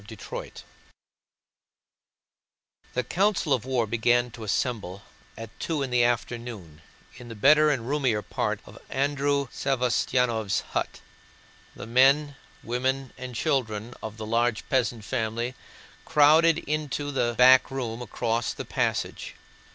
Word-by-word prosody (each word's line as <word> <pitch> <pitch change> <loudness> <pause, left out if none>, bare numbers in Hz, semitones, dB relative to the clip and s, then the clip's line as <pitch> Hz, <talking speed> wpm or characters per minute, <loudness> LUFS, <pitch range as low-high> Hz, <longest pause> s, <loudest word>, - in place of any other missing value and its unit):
CHAPTER 105 +1 -8
IV - - -13 2.3
The 125 - +1
Council 190 - +1
of 125 -3 -1
War 130 -3 0
began 120 +2 +1
to 115 - -10
assemble 100 -3 -2 0.3
at 115 -1 -8
two 155 -4 -1
in 130 - -4
the 120 -1 +3
afternoon 115 -9 -3 0.4
in 120 - -11
the 115 - -8
better 150 +7 +5
and 125 -6 -1
roomier 130 -7 0
part - - -2
of - - -13
Andrew 140 0 0
Savostyánov's 125 -4 0
hut. - - -3 0.7
The - - -8
men, 135 +5 +4 0.3
women, 130 +2 -2
and 130 -1 -8
children 120 -5 -1
of 110 0 -7
the 110 - -6
large 115 0 0
peasant 120 -4 0
family 120 0 -2 0.5
crowded 155 +2 +5
into 150 -2 -3
the 120 -3 0
back 130 +1 +7
room 125 -3 -4
across 115 0 -2
the - - -7
passage. - - -2
125 Hz, 130 wpm, -26 LUFS, 115-135 Hz, 2.3 s, back